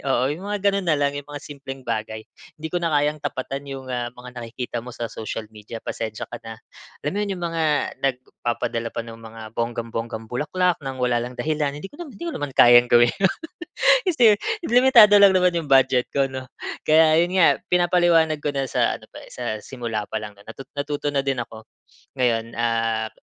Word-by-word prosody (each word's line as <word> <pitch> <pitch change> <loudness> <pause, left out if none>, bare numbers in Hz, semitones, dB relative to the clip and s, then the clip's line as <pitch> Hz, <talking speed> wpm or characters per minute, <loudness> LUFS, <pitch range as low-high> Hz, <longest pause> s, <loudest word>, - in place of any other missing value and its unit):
oo, 135 -2 +1
'yung 155 +6 -4
mga 205 0 -2
gano'n 195 -2 -2
na 155 - +3
lang 140 0 +1
'yung 145 0 -7
mga 145 - -5
simpleng 135 -2 -9
bagay. 110 -1 -4 0.3
"Hindi 160 - -5
ko 175 - -1
na 165 - +1
kayang 150 0 +1
tapatan 135 +1 -4
'yung 135 -1 -7
ah, 120 -1 -3
mga 125 0 -12
nakikita 120 0 -5
mo 125 - -9
sa 120 0 -5
social 110 0 -6
media. 105 +2 -8
Pasensya 110 -1 -5
ka - - -10
na." 115 0 -9 0.5
Alam 150 - 0
mo - - -1
yun? 200 - -3
'Yung 175 - -4
mga 165 -1 -2 0.4
nagpapadala 120 -3 -2
pa 115 - -4
ng 115 0 -10
mga 115 0 -11
bonggang-bonggang 115 -1 -4
bulaklak, 160 +9 0
nang 135 -1 -5
wala 125 -1 +1
lang 125 +1 -8
dahilan. 150 -2 -1
Hindi 195 - -7
ko 290 - -10
naman 290 -6 -10
hindi - - -6
ko 335 - -3
naman 145 -1 -4
kayang 120 0 +7
gawin 120 0 +5
'yon. 190 - +5 0.8
Kasi 315 -10 +3 0.4
limitado 235 -4 +7
lang 200 -1 +7
naman 180 -1 +4
'yung 165 -3 -2
budget 130 -2 +4
ko, 135 -1 +1
'no? 130 -1 -6 0.4
Kaya 155 0 +5
yun 175 +2 +1
nga 185 -3 +5
pinapaliwanag 175 -3 +3
ko 145 -1 -3
na 135 -1 -2
sa - - +1
ano - - -17
pa - - -11
eh, - - -15
sa 120 -3 -3
simula 115 -3 -5
pa 110 0 -4
lang 105 -1 -9
'no? 100 - -18
Natu 115 +4 -9 0.2
natuto 145 0 -2
na 140 -1 0
din 130 -3 0
ako. 110 -1 -12 0.5
Ngayon, 115 -2 0
ah, 115 -1 0
135 Hz, 205 wpm, -23 LUFS, 115-155 Hz, 0.8 s, kayang